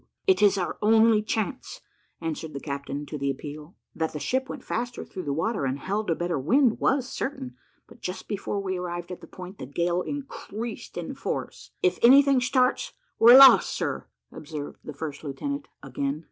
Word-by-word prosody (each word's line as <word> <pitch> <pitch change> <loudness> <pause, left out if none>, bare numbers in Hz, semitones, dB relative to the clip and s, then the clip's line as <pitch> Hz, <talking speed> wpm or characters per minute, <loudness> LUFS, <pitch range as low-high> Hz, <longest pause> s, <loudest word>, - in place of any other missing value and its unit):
"It 380 -1 +3
is 200 -1 +5
our 180 - -3
only 220 0 +5
chance," 220 +5 -3 0.4
answered 160 -1 -4
the - - -3
captain 140 0 -5
to 150 0 -6
the 140 0 -1
appeal. 150 +4 -7 0.2
That 160 -1 -2
the 150 - -4
ship 265 - -1
went 260 - -7
faster 240 +1 -4
through 185 -4 -7
the 145 - -1
water, 165 +5 -1
and 135 0 -1
held 200 +7 -3
a 165 - +2
better 175 -3 -2
wind, 235 - +3
was 265 -2 +1
certain; 130 - -5 0.3
but - - -18
just 180 +1 -5
before 205 0 -3
we 190 -2 -2
arrived 175 0 -5
at 180 - -7
the - - -12
point, 185 +1 -10
the - - -6
gale 170 +5 0
increased 240 -4 -6
in - - -4
force. - - -5
"If 375 - +2
any 270 +4 +8
thing 275 -2 +3
starts, 255 - +1 0.3
we 230 +1 +8
are - - +11
lost, 270 -1 +9
sir," - - -3 0.2
observed 150 -1 -8
the - - -7
first 145 0 -6
lieutenant 280 - -4 0.2
again. 140 +2 -3
185 Hz, 190 wpm, -26 LUFS, 150-245 Hz, 0.4 s, are